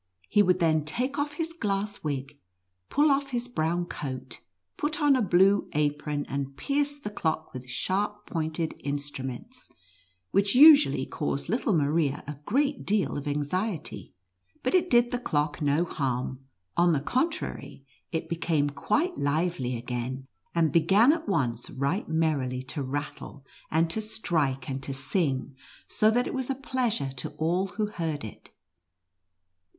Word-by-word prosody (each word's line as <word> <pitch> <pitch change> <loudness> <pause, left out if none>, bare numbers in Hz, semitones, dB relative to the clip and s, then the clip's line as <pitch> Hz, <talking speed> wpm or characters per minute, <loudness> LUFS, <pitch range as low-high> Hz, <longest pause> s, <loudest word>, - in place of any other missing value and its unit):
He 205 - +5
would 180 -2 +4
then 160 -3 +2
take 250 - -2
off 290 0 -1
his 330 +2 -3
glass 205 -7 -2
wig, 140 -1 -4 0.5
pull 295 +1 +4
off 275 0 +1
his 245 -1 -2
brown 175 -6 0
coat, 130 -6 -6 0.3
put 295 0 -2
on 290 -3 +5
a 255 - +2
blue 195 +1 +4
apron, 150 0 0
and 140 0 -4
pierce 290 0 0
the 210 -7 -6
clock 160 -5 -2
with 130 0 -8
sharp 205 +8 -2
pointed 160 0 -2
instruments, 145 - -5 0.6
which 200 +3 +2
usually 300 +2 +8
caused - - -3
little 210 - +1
Maria 145 -1 +1
a 145 -1 -7
great 280 +5 +1
deal 205 -1 +1
of 145 0 -4
anxiety. 155 - -3 0.5
But 255 - 0
it 360 -1 +3
did 240 0 +4
the 245 - -1
clock 150 -8 -1
no 145 +4 +2
harm; 130 -3 -3 0.3
on 175 0 +4
the 145 - +2
contrary, 255 - -2 0.3
it 165 -1 -2
became 165 -3 0
quite 295 - 0
lively 145 -4 0
again, 125 +2 -4 0.3
and 165 -3 +3
began 195 - +5
at 320 -5 -4
once 125 - 0
right 140 +10 -1
merrily 145 -6 0
to 130 +3 -4
rattle, 140 0 -5 0.2
and 160 +2 +2
to 220 - -1
strike, 155 -11 -1
and 135 0 -3
to 135 0 -4
sing, 135 -1 -1 0.3
so 215 - +3
that 245 +3 +2
it - - -4
was 260 -1 -3
a 270 - 0
pleasure 250 - -1
to - - -3
all 175 +5 +1
who 215 - +2
heard 165 -8 -3
it. 110 - -10
165 Hz, 155 wpm, -28 LUFS, 140-225 Hz, 0.6 s, usually